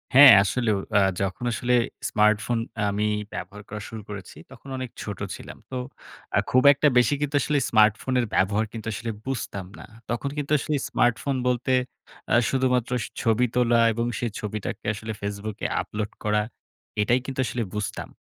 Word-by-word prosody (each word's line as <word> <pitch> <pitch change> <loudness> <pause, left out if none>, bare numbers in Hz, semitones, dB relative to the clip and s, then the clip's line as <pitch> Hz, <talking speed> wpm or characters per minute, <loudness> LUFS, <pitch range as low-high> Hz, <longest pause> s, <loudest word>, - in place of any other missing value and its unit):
হ্যাঁ, 135 +1 +11
আসলেও। 110 +1 0 0.2
আ - - +7 0.2
যখন 95 +4 -2
আসলে 125 +3 0 0.4
স্মার্টফোন 105 +2 +2 0.3
আমি 105 +1 0 0.3
ব্যবহার 105 +1 -7
করা 105 +1 -6
শুরু 110 -1 -7
করেছি, 100 -6 -8
তখন 135 - -13
অনেক 130 -1 -4
ছোট 100 -3 -6 0.2
ছিলাম। - - -10
তো 130 - -3 0.6
আ - - +6
খুব 130 0 +5
একটা 145 +2 +2
বেশি 125 +1 +4
কিন্তু 145 0 -1
আসলে 145 +2 +1
স্মার্টফোনের 110 +3 +3
ব্যবহার 100 +4 +2
কিন্তু 115 -1 -7
আসলে 115 +1 -4
বুঝতাম 110 -7 -4
না। - - -10 0.2
তখন 120 +4 -2
কিন্তু 145 0 -3
আসলে 150 - -1
স্মার্টফোন 125 +3 +1
বলতে 125 +1 0 0.6
আ - - +6
শুধুমাত্র 125 -2 +1
স - - -4 0.2
ছবি 115 +1 +3
তোলা 120 -1 +4
এবং 115 +2 -1
সেই 120 -2 -2
ছবিটাকে 105 -1 -5
আসলে 110 +1 -6
Facebook 100 +1 -4
এ - - +3
আপলোড 105 0 -4
করা 105 0 +2 0.6
এটাই 120 +5 +3
কিন্তু 135 -1 -6
আসলে 115 +1 -2
বুঝতাম। 105 -1 -4
115 Hz, 165 wpm, -25 LUFS, 105-125 Hz, 0.6 s, হ্যাঁ